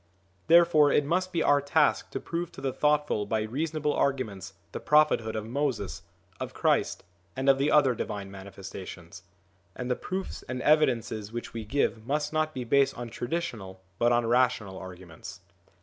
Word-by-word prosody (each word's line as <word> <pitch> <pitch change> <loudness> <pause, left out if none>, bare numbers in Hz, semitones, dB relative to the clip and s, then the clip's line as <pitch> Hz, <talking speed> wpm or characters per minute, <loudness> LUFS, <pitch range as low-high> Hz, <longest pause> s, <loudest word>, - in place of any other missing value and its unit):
Therefore 165 -3 +6
it 145 - +3
must 185 +4 0
be 165 -2 0
our 145 0 +4
task 140 0 +2
to - - -4
prove 170 0 -4
to - - -10
the 135 -2 -2
thoughtful 150 -8 +1
by 110 +1 0
reasonable 150 +6 -2
arguments 105 -9 -1 0.2
the - - -5
prophethood 150 -7 +3
of 110 -1 -3
Moses, 125 -4 -2 0.4
of - - -6
Christ, - - +1 0.3
and 135 +1 -3
of 135 -1 +5
the 140 +2 +2
other 140 -4 +5
Divine 100 -3 -5
Manifesta 95 -1 -9
tions. 85 -2 -10 0.5
And 125 0 -4
the - - +2
proofs 190 +7 -5
and 130 0 -3
evidences 115 -8 +2
which 120 0 -6
we 115 -1 -5
give 115 -2 0
must 150 +2 -1
not 155 0 +1
be 130 -4 -5
based 140 +3 +2
on 120 -1 -6
traditional 115 - -4 0.2
but 120 +1 +3
on 120 -1 +2
rational 115 -5 +1
arguments. 90 -2 -10
130 Hz, 170 wpm, -28 LUFS, 110-150 Hz, 0.5 s, Therefore